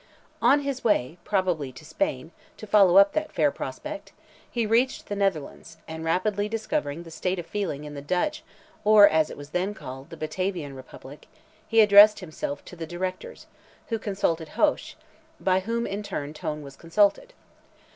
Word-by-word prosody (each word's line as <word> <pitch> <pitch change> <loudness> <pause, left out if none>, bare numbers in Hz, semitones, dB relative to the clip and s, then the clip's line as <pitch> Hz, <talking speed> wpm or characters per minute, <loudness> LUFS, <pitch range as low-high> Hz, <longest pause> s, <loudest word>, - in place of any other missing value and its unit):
On 285 +1 +5
his 275 -2 -4
way, 175 - +1
probably 180 -9 0
to 155 - -13
Spain, 130 +1 -2 0.3
to - - -9
follow 200 -3 +5
up 200 0 +7
that 310 0 -2
fair 150 -3 +2
prospect, 295 - -7 0.4
he 235 -2 -1
reached 235 +4 +1
the 205 - -4
Netherlands, 170 -5 -2
and 160 0 -6
rapidly 205 +5 0
discovering 170 -8 -3
the 165 - -12
state 180 +3 -2
of 175 - -5
feeling 170 -7 -3
in 150 0 -8
the 140 - -7
Dutch, 180 - -1 0.4
or 210 -1 +8
as 160 -3 +2
it - - -9
was 145 +1 -11
then 190 +4 -1
called, 135 -4 -9
the 165 - -10
Batavian 155 -2 -3
republic, 130 +2 -12 0.4
he 225 0 +5
addressed 210 0 +8
himself 155 -5 -6
to - - -11
the 165 -2 -6
Directors, 185 - -5 0.4
who 225 -1 -1
consulted 170 -7 -1
Hoche, 305 -1 +1 0.4
by 185 -1 +2
whom 230 +4 -2
in 200 +1 -4
turn 150 -7 -5
Tone 150 -1 -5
was 140 -1 -11
consulted. 205 - +1
185 Hz, 170 wpm, -26 LUFS, 155-210 Hz, 0.4 s, or